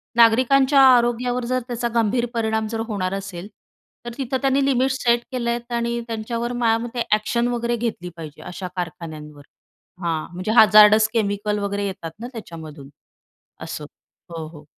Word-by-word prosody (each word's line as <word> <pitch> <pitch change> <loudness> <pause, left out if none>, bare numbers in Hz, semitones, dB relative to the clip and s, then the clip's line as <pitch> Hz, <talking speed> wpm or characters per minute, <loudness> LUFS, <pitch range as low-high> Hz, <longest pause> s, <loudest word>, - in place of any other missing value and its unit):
नागरिकांच्या 260 +4 +5
आरोग्यावर 245 +1 0
जर 255 +1 0
त्याचा 240 -1 -2
गंभीर 235 +1 +2
परिणाम 220 -1 0
जर 225 0 -4
होणार 190 -4 -2
असेल, 195 -1 -6 0.6
तर 240 - -5
तिथं 265 -1 -1
त्यांनी 270 0 +2
लिमिट 265 -1 +2
सेट 240 -2 +1
केले 240 -2 -2
आहेत 240 0 -3
आणि 235 0 -1
त्यांच्यावर 230 +1 -3
माझ्यामते 235 0 0
एक्शन 235 +3 -1
वगैरे 240 0 -1
घेतली 220 -6 -3
पाहिजे, 155 -2 -9
अशा 180 +1 -6
कारखान्यांवर. 155 -4 -7 0.6
हां, 165 -2 -2
म्हणजे 185 +4 -3
हजारडस 215 0 +7
केमिकल 210 -1 0
वगैरे 200 0 -2
येतात 170 -4 -5
ना 235 - -6
त्याच्यामधून. 160 - -9 0.7
असं. - - -6 0.5
हो, 165 -2 -6
हो. 150 -2 -13
225 Hz, 145 wpm, -22 LUFS, 190-240 Hz, 0.7 s, हजारडस